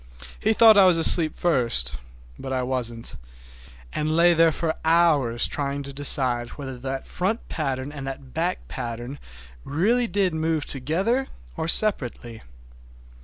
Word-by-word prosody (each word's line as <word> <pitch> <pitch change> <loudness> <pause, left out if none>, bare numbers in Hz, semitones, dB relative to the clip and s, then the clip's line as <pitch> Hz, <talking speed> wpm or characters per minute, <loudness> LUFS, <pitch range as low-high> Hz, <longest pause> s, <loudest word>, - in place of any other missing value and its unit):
He 220 - +1
thought 220 -2 +6
I 195 - +6
was 180 -2 +3
asleep 165 -1 +5
first, 120 - 0 0.5
but 135 - -7
I 130 -1 -2
wasn't,—I - - -8
lay 165 +3 +2
there 165 0 +3
for 160 +1 -3
hours 155 -8 +2
trying 140 -1 -4
to 140 0 -9
decide 130 -4 +4
whether 135 -3 -8
that 135 +1 -6
front 200 +6 -3
pattern 135 -2 -4
and 140 -2 -8
the 135 - -5
back 160 +7 -5
pattern 120 +4 -7 0.4
really 225 - 0
did 195 -5 -1
move 160 -1 -2
together 190 - -2 0.3
or 160 -1 -4
separately. 125 - +2
145 Hz, 135 wpm, -23 LUFS, 125-170 Hz, 0.5 s, thought